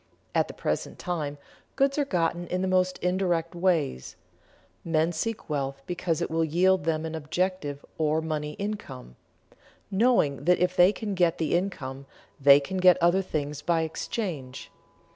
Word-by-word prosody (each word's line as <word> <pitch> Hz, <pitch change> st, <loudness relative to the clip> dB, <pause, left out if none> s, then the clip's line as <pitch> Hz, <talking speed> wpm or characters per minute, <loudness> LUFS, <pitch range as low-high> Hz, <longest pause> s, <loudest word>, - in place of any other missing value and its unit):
At -, -, +2 dB
the -, -, -10 dB
present -, -, -3 dB
time 155 Hz, -5 st, -3 dB, 0.4 s
goods 275 Hz, +2 st, +2 dB
are 290 Hz, -, +2 dB
gotten 175 Hz, -5 st, -1 dB
in 180 Hz, +1 st, -1 dB
the -, -, 0 dB
most 185 Hz, 0 st, +2 dB
indirect 180 Hz, -2 st, 0 dB
ways; 170 Hz, -, 0 dB, 0.7 s
men 165 Hz, 0 st, +1 dB
seek 215 Hz, +7 st, -3 dB
wealth 135 Hz, -2 st, -3 dB
because 175 Hz, -2 st, -1 dB
it -, -, -4 dB
will 165 Hz, 0 st, +1 dB
yield 180 Hz, +2 st, +2 dB
them 160 Hz, -1 st, 0 dB
an 160 Hz, -, -5 dB
objective 160 Hz, -2 st, -2 dB
or 155 Hz, 0 st, +2 dB
money 155 Hz, -2 st, -3 dB
income, 150 Hz, -, -6 dB, 0.8 s
knowing 190 Hz, -, +2 dB
that 180 Hz, +1 st, +5 dB
if 180 Hz, +1 st, +1 dB
they 180 Hz, +2 st, +6 dB
can 210 Hz, -1 st, -4 dB
get 175 Hz, -2 st, +2 dB
the 160 Hz, -3 st, -1 dB
income, 140 Hz, -8 st, -3 dB, 0.3 s
they 140 Hz, 0 st, +8 dB
can 145 Hz, +7 st, -5 dB
get 185 Hz, -1 st, +6 dB
other 175 Hz, +2 st, +3 dB
things 150 Hz, -5 st, -4 dB
by 165 Hz, +1 st, +1 dB
exchange. 160 Hz, -, -5 dB
170 Hz, 160 wpm, -27 LUFS, 150-185 Hz, 0.8 s, they